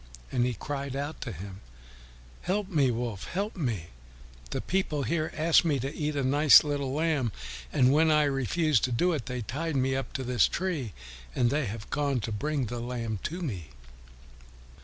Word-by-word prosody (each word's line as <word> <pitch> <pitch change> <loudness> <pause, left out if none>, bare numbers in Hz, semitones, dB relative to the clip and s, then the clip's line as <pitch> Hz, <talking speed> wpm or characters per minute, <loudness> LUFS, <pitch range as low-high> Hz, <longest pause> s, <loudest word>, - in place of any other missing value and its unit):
And 125 -1 +2
he 125 - -2
cried 140 +3 -4
out 145 +3 -4
to 125 - -4
him, 95 +2 -8 0.8
"Help 195 +2 -1
me, 145 -8 +3
Wolf! 115 -4 -3
Help 200 +4 -3
me! 115 - -2 0.6
The - - -2
people 170 -7 -1
here 155 +2 -1
asked 160 +2 +5
me 155 -4 +2
to 135 +3 -4
eat 150 -1 -2
up 140 -2 0
a - - +2
nice 145 +2 +7
little 145 -3 -2
lamb, 150 -5 +1 0.4
and 130 +1 +4
when 160 +2 +4
I 150 -1 +5
refused 145 0 +1
to 125 - -3
do 175 +9 +2
it, 145 -7 -3
they 125 -1 -3
tied 150 +8 -3
me 130 0 +1
up 135 - -3
to 135 -4 -3
this 125 -3 +3
tree, 160 - -2 0.4
and 120 -1 +3
they 145 -3 0
have 105 +2 -6
gone 140 -3 +1
to 110 - -4
bring 140 +5 -1
the 120 +2 -4
lamb 115 -3 -3
to 175 +3 -3
me." 95 - -4
140 Hz, 190 wpm, -28 LUFS, 120-155 Hz, 0.8 s, nice